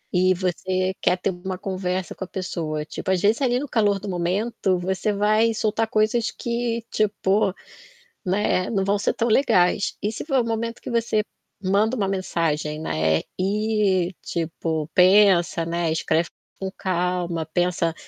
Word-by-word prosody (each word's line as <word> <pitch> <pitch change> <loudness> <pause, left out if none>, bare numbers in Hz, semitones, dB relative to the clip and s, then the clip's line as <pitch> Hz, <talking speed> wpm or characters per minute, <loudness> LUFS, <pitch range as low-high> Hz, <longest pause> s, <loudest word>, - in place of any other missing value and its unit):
E 185 +1 +4
você 185 +1 -1
quer 180 - +3
ter 185 - -1
uma 185 +1 -5
conversa 185 -2 -3
com - - -7
a - - -6
pessoa, 160 -5 -4
tipo, 175 - -6
às 190 - +2
vezes, 215 +7 +2
ali 245 -2 +2
no 290 - -4
calor 205 -5 +2
do 200 - -8
momento, 185 +2 0
você 185 +3 -1
vai 215 +2 +2
soltar 220 +1 0
coisas 215 +1 +1
que, 235 0 -3
tipo 205 -1 +1 0.7
né, 185 -1 +1
eh, - - -5
não 195 -4 +1
vão 200 +1 +2
ser - - +1
tão 230 - 0
legais. 200 -5 +3
E 210 - 0
se 220 - -5
for 270 -4 +1
o - - -3
momento 230 0 -3
que - - -6
você 230 -2 +1 0.4
manda 205 +5 +2
uma 200 -3 0
mensagem, 165 -5 -1
né, 80 - +1 0.2
e, 200 -2 +1
tipo, 160 -2 -3
pensa, 185 -3 +5
né, 170 0 -1
escreve 160 +1 0 0.3
com 190 - -3
calma, 180 -3 -1
pensa, 175 0 0
190 Hz, 165 wpm, -23 LUFS, 175-215 Hz, 0.7 s, pensa